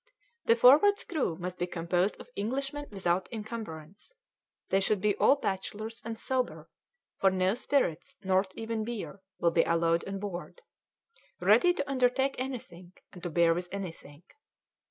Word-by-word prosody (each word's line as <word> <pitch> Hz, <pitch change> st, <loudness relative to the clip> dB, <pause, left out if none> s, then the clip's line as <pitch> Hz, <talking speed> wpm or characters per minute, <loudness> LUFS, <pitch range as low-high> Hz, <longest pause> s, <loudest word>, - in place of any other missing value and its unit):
The 230 Hz, -, +5 dB
Forward's 290 Hz, -, +6 dB
crew 270 Hz, -, -2 dB
must 180 Hz, 0 st, -5 dB
be 175 Hz, -, 0 dB
composed 175 Hz, +3 st, 0 dB
of -, -, -12 dB
Englishmen 275 Hz, +7 st, -3 dB
without 185 Hz, -2 st, 0 dB
incumbrance; 210 Hz, -, -7 dB, 0.6 s
they 195 Hz, -, +3 dB
should 195 Hz, +1 st, +1 dB
be 205 Hz, +1 st, +1 dB
all 275 Hz, -, +5 dB
bachelors 215 Hz, -1 st, -4 dB
and 225 Hz, 0 st, -5 dB
sober 255 Hz, +1 st, -2 dB, 0.5 s
for 195 Hz, -, +4 dB
no 185 Hz, 0 st, +1 dB
spirits, 240 Hz, -, -1 dB
nor 190 Hz, +1 st, +3 dB
even 225 Hz, -1 st, -3 dB
beer, 215 Hz, -3 st, -5 dB, 0.2 s
will 170 Hz, -, +2 dB
be 165 Hz, -, +4 dB
allowed 170 Hz, 0 st, +2 dB
on 195 Hz, 0 st, -3 dB
board 200 Hz, -, -7 dB, 0.8 s
ready 355 Hz, -, +5 dB
to -, -, -2 dB
undertake 265 Hz, 0 st, +2 dB
anything, 185 Hz, -9 st, -6 dB, 0.2 s
and 180 Hz, -, -11 dB
to 175 Hz, -, -3 dB
bear 170 Hz, 0 st, +4 dB
with 175 Hz, +1 st, -4 dB
anything. 170 Hz, -5 st, -7 dB
200 Hz, 150 wpm, -30 LUFS, 175-245 Hz, 0.8 s, Forward's